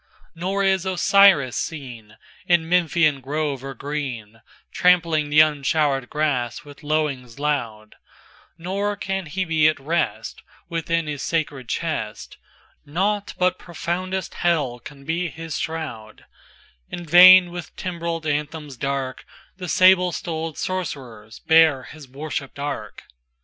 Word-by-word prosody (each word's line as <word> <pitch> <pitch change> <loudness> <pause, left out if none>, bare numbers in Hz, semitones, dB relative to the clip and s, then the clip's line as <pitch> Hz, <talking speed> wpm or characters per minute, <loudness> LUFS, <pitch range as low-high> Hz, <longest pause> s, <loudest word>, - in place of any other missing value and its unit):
XXIVNor 195 +4 -1
is 190 -2 +2
Osiris 190 -6 +4
seenIn 135 +4 -3
Memphian 160 -4 +2
grove 140 0 -3
or 135 0 -7
green, 120 -6 -5 0.3
Trampling 165 -4 +2
the 150 +1 +6
unshowered 145 -3 +1
grass 140 -6 -1
with 145 +1 -13
lowings 145 -6 -2
loud; 115 -8 -3 0.6
Nor 200 +4 -2
can 195 -3 -4
he 185 +5 -2
be 160 -2 +3
at 155 - +2
restWithin 165 +2 -3
his 145 -2 -4
sacred 145 -7 -2
chest; - - -4 0.5
Nought 200 +7 -2
but 180 0 +1
profoundest 185 +2 -4
Hell 145 -8 0
can 140 +3 -12
be 170 +3 -1
his 165 -2 -6
shroud; 120 -10 -6 0.6
In 175 -1 -7
vain, 180 +2 +8
with 175 -2 -8
timbreled 170 -3 -4
anthems 150 -2 -3
dark, 135 0 -3 0.3
The 180 -2 -6
sable 185 -1 +5
stolèd 160 -1 -4
Sorcerers 125 -12 -5
bear 160 -5 +4
his 150 -4 -12
worshiped 140 0 -6
ark. 140 -7 -5
155 Hz, 120 wpm, -22 LUFS, 140-175 Hz, 0.6 s, vain